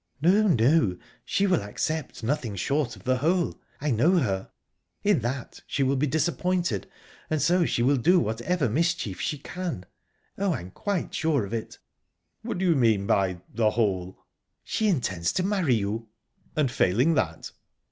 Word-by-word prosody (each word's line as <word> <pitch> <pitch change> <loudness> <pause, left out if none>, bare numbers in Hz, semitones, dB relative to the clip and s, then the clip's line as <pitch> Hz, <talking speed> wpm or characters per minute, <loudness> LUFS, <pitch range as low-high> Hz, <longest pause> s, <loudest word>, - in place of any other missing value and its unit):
"No, 195 +8 +4
no; 125 - +3 0.3
she 200 - +1
will 185 - +2
accept 135 +7 -3
nothing 120 -4 -1
short 135 +4 -1
of 95 - -16
the 130 0 +1
whole 170 +6 0 0.2
I 150 0 -1
know 155 - +4
her. 95 - -1 0.5
In 205 -6 +3
that 120 +2 -4
she 140 - 0
will 135 +1 +2
be 140 +3 +1
disappointed, 170 - 0 0.4
and 155 - 0
so 170 +5 +3
she 120 - 0
will 140 +3 +3
do 175 +9 +4
whatever 135 +5 0
mischief 150 - -1
she 150 - -1
can. 165 - -5 0.5
Oh, 195 -4 +1
I'm 90 -7 -7
quite 200 - -3
sure 150 -9 +1
of 100 - -8
it." 115 -1 -4 0.6
"What - - -4
do 190 - -1
you 170 - +4
mean 110 -7 +3
by 95 -3 +1
'the 110 -1 +3
whole'?" 95 -5 -1 0.5
"She 220 - 0
intends 95 - 0
to 185 - 0
marry 185 - +2
you." 110 +2 -2 0.5
"And 145 -5 +1
failing 125 - +3
that?..." 80 - -1
135 Hz, 165 wpm, -26 LUFS, 110-170 Hz, 0.6 s, No